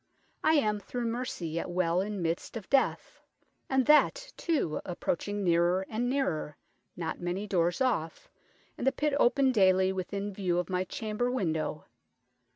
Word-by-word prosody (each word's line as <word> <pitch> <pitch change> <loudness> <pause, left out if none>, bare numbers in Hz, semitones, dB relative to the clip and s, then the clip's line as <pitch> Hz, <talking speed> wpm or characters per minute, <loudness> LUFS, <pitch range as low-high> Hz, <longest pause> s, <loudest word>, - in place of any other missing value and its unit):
I 315 - +4
am, 210 -7 +2
through 240 +4 -4
mercy, 230 -7 -3
yet 165 +3 -3
well 175 0 +1
in 200 -2 -3
middest 165 +8 -2
of 215 - -9
death, 275 -1 +1 0.5
and 265 -1 +2
that, 400 +12 +4
too, 300 - -1
approaching 200 +3 -2
neerer 175 +2 +2
and 240 +3 -1
neerer: 215 - -1 0.4
not 165 -2 -4
many 175 +4 -2
doores 175 0 0
off, 165 -11 -1 0.5
and 255 - -1
the - - +6
pitt 300 +1 -1
open 265 +2 +4
dayly 190 -4 +4
within 200 +2 -4
view 185 -3 -1
of 180 0 -2
my 185 0 0
chamber 220 +4 -2
window. 160 -11 -2
195 Hz, 155 wpm, -30 LUFS, 175-245 Hz, 0.5 s, the